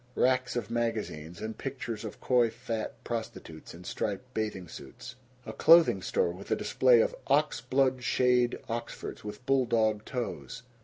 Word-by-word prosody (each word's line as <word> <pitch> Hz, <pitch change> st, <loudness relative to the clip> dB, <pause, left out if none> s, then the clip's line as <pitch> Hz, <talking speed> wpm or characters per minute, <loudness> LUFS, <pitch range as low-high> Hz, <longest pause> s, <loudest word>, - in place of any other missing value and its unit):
Racks 130 Hz, 0 st, +2 dB
of 115 Hz, -2 st, -3 dB
magazines, 105 Hz, -9 st, -3 dB
and 110 Hz, 0 st, -4 dB
pictures 125 Hz, -5 st, -5 dB
of 110 Hz, -, -7 dB
coy 120 Hz, -2 st, +3 dB
fat 115 Hz, -1 st, -5 dB
prostitutes 110 Hz, -9 st, -6 dB
in 85 Hz, -, -12 dB
striped 105 Hz, +7 st, -4 dB
bathing 105 Hz, -5 st, -3 dB
suits. 120 Hz, -, -10 dB, 0.3 s
A -, -, -6 dB
clothing 165 Hz, +1 st, +6 dB
store 475 Hz, -1 st, +1 dB
with -, -, -10 dB
a -, -, +3 dB
display 480 Hz, -2 st, +4 dB
of -, -, 0 dB
"ox -, -, +2 dB
blood 130 Hz, -1 st, +1 dB
shade 125 Hz, -1 st, +2 dB
Oxfords 115 Hz, 0 st, -5 dB
with 105 Hz, +4 st, -8 dB
bull 135 Hz, -2 st, +2 dB
dog 110 Hz, -2 st, +2 dB
toes." 125 Hz, 0 st, -5 dB
120 Hz, 155 wpm, -29 LUFS, 110-130 Hz, 0.3 s, clothing